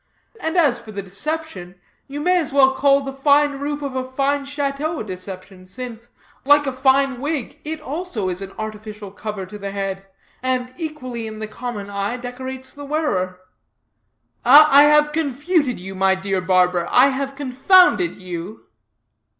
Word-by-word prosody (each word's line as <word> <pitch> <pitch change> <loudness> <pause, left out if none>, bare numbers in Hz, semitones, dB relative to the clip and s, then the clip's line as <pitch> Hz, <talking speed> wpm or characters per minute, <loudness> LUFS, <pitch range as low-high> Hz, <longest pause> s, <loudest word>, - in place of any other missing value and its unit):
And 320 +3 -2
as 290 -8 +3
for 215 - -11
the 200 -1 -5
deception, 195 - -5 0.3
you 285 +2 -6
may 360 +3 +3
as 315 - -2
well 270 -1 +5
call 275 +1 +3
the 270 0 -5
fine 285 +1 +3
roof 290 +1 -3
of 275 -2 -4
a 260 - -1
fine 275 +2 -1
chateau 285 +2 -2
a - - -3
deception, 185 -1 -9
since, 235 +3 -7 0.3
like 290 +1 +5
a 270 - -2
fine 265 0 +2
wig, 290 -4 -4
it 310 +1 -4
also 300 - -4
is 180 +1 -3
an 195 0 -7
artificial 215 -1 -7
cover 205 -1 -6
to 210 +3 -10
the 200 0 -5
head, 195 -1 -4 0.3
and 255 0 -1
equally, 255 -8 -5
in 215 0 -8
the 215 0 -5
common 215 -2 -6
eye, 200 +4 -2
decorates 260 +1 -7
the 285 - -10
wearer. 200 - -2 1.0
I 285 +2 +8
have 300 0 +4
confuted 290 - 0
you, 190 +2 -8
my 190 0 +2
dear 190 0 -2
barber; 180 -1 +2
I 260 +3 +6
have 275 0 -3
confounded 290 +7 +4
you." 180 +3 -8
255 Hz, 165 wpm, -21 LUFS, 200-285 Hz, 1.0 s, I